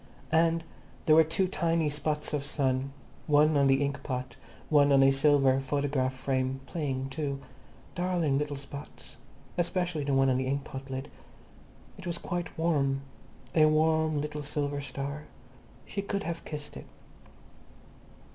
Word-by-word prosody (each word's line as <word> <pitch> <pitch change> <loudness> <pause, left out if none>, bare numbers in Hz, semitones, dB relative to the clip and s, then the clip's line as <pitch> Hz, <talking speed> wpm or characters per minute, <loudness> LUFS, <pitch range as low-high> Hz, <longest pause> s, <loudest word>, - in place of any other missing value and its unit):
And 165 +1 +3 0.4
there 155 - +6
were 160 - +8
two 165 +4 0
tiny 165 -2 +1
spots 150 +1 -2
of 145 -2 0
sun, 135 -2 0 0.4
one 150 +1 +5
on 140 -1 +4
the 135 +1 +4
inkpot, 130 -3 -4 0.3
one 145 -2 +5
on 135 -1 +6
a 135 - +6
silver 135 -1 +4
photograph 135 -1 0
frame, 130 0 -1
playing 135 -5 -3
too. 140 0 -3 0.5
Darling 175 -6 +1
little 150 -1 -2
spots. 140 0 -10 0.4
Especially 175 -3 0
the 140 -1 +1
one 135 0 +4
on 130 -1 +3
the 130 0 -1
inkpot 135 0 -4
lid. 130 +1 -5 0.9
It 190 - -7
was 170 -1 -2
quite 175 -1 -4
warm. 140 -5 +1 0.5
A 155 -2 +6
warm 155 0 +2
little 150 0 -3
silver 145 0 -2
star. 140 +2 -5 0.6
She 200 - -3
could 200 0 -3
have 170 -2 -4
kissed 150 -1 -7
it. - - -9
145 Hz, 145 wpm, -29 LUFS, 135-160 Hz, 0.9 s, were